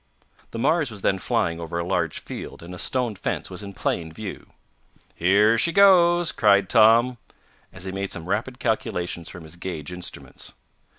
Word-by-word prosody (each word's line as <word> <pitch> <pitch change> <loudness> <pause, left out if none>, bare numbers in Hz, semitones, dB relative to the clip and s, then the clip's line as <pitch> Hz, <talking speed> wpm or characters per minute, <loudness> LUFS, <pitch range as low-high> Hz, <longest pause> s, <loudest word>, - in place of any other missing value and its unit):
The - - -7
Mars 150 +4 +2
was 105 -4 -10
then 95 - +2
flying 85 -2 0
over 85 0 -5
a 85 - -2
large 85 -3 -1
field - - -8
and 85 +1 -9
a 90 - -8
stone 125 -4 +1
fence 95 - -4
was - - -6
in 100 -1 -8
plain 80 -3 -2
view. 105 +3 -8 0.7
"Here 105 +6 +3
she 170 - +2
goes!" 175 -3 +5
cried 100 -3 +3
Tom, 115 +2 +5 0.5
as 90 - -11
he 95 - -4
made 100 0 -4
some 80 - -5
rapid 110 +7 -2
calculations 90 - -2
from 90 -3 -10
his 80 +2 -12
gauge 85 -3 -6
instruments. 90 0 -7
100 Hz, 175 wpm, -24 LUFS, 90-120 Hz, 0.7 s, goes